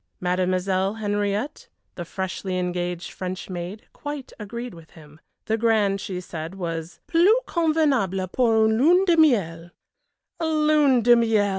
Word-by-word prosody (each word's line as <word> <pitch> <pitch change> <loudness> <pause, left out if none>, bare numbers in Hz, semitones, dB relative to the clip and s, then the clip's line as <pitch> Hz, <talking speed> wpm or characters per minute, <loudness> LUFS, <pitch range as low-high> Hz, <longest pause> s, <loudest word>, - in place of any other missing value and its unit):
Mademoiselle 185 +2 0
Henriette, 205 +5 -2 0.3
the 175 - -6
freshly 185 +1 -4
engaged 180 -1 -3
French 185 +1 -6
maid, 180 +4 -6
quite 290 -2 -7
agreed 235 +4 -6
with 165 -2 -14
him. 150 -1 -15 0.3
The 220 +1 -1
Grand, 210 -4 +2
she 185 -2 -4
said, 165 0 -7
was 165 -2 -5
"plus 345 +3 +4 0.2
convenable 285 - +1
pour 225 -3 +3
une 220 +1 +2
lune 355 +8 +5
de 345 -3 +4
Miel 190 - +2 0.4
" - - -53
Lune 305 -5 +3
de 240 +1 +7
Miel! 225 -3 +2
205 Hz, 140 wpm, -24 LUFS, 180-250 Hz, 0.4 s, de